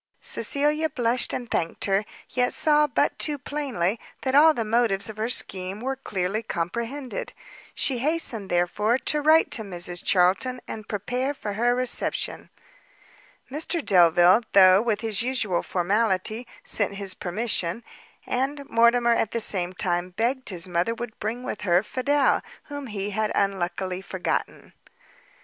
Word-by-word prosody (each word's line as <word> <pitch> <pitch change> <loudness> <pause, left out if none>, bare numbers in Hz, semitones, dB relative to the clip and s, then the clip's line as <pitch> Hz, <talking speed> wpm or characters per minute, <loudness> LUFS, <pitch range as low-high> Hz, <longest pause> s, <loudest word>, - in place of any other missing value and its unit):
Cecilia 300 +2 0
blushed 240 -2 0
and 240 -1 -5
thanked 165 - -2
her, 195 +1 +1 0.2
yet 250 -1 0
saw 300 -1 +3
but 255 - 0
too 295 -2 +1
plainly 255 -9 -2 0.2
that 260 - -1
all 305 +3 +7
the 235 -7 -3
motives 220 -2 +1
of 215 - -15
her 220 +2 -2
scheme 190 -4 0
were 265 +3 -3
clearly 205 -5 -2
comprehended. 230 +6 -4 0.4
She 260 -3 0
hastened, 260 -8 -1
therefore, 205 +7 +1
to 300 +3 -1
write 315 +2 +4
to - - +1
Mrs 175 -3 -4
Charlton, 195 +8 +2
and 215 -1 -7
prepare 250 +7 -2
for 210 -6 -5
her 240 +4 +1
reception. 255 -1 +1 1.0
Mr 315 +2 -2
Delvile, 175 +1 +5
though 190 0 +7
with 220 -3 -1
his 220 -3 0
usual 230 -8 0
formality, 210 +4 0 0.2
sent 200 -2 -1
his 195 -2 -1
permission; 185 +1 -2 0.4
and 275 +3 -2
Mortimer 235 +1 +4
at 225 - 0
the 230 - -2
same 185 -5 +1
time, 180 -1 -1
begged 255 +3 0
his 180 -3 -1
mother 175 +6 0
would 235 -1 -7
bring 230 +4 -4
with 215 - -5
her 180 -1 +2
Fidel, 275 +5 +1 0.2
whom 285 -2 -7
he 205 -2 -4
had 215 +1 -1
unluckily 190 -1 -1
forgotten. 185 -1 -4
220 Hz, 145 wpm, -25 LUFS, 190-255 Hz, 1.0 s, all